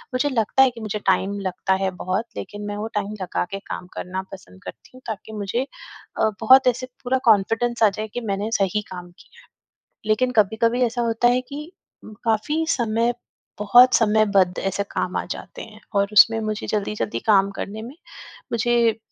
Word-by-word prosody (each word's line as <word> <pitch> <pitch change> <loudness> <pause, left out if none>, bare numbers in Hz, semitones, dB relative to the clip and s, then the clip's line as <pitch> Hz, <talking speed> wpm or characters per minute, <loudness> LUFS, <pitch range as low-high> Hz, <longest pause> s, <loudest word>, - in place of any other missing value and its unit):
मुझे 290 +3 +1
लगता 250 +1 +3
है 265 - +4
कि 230 -1 -11
मुझे 215 -1 -3
टाइम 195 +1 +1
लगता 190 0 -1
है 190 - +1
बहुत, 190 +5 -1
लेकिन 205 0 -7
मैं 205 - -4
वो 215 +2 -3
टाइम 205 0 -2
लगा 180 - -2
के 195 - -4
काम 180 - -5
करना 185 +1 -4
पसंद 95 - -13
करती 90 +4 -11
हूँ, 255 - -14
ताकि 220 0 -6
मुझे 205 +5 -1 0.6
अ, 220 - +3
बहुत 260 +3 +6
ऐसे 250 +1 +1 0.2
पूरा 260 +1 +1
कॉन्फिडेंस 225 +2 +2
आ 210 - +7
जाए 215 +2 -5
कि 245 - -3
मैंने 205 +3 -2
सही 195 +2 +1
काम 180 -1 -8
किया - - -19
है। - - -23 0.6
लेकिन 250 +4 +1
कभी-कभी 230 +4 +1
ऐसा 240 +1 -2
होता 230 +1 +2
है - - +1
कि 300 +4 -7 0.5
काफ़ी 235 +9 0
समय 230 0 0 0.4
बहुत 240 +5 +6
समयबद्ध 210 -4 +3
ऐसे 195 +1 -1
काम 185 - -2
आ - - -1
जाते - - -9
हैं 215 -1 -13 0.2
और 200 0 +2
उसमें 225 +2 +6
मुझे 215 -1 -3
जल्दी-जल्दी 210 0 -2
काम 200 -2 +4
करने 215 +3 -6
में 245 +4 -9 0.6
मुझे 235 -1 +2
215 Hz, 180 wpm, -22 LUFS, 200-235 Hz, 0.6 s, आ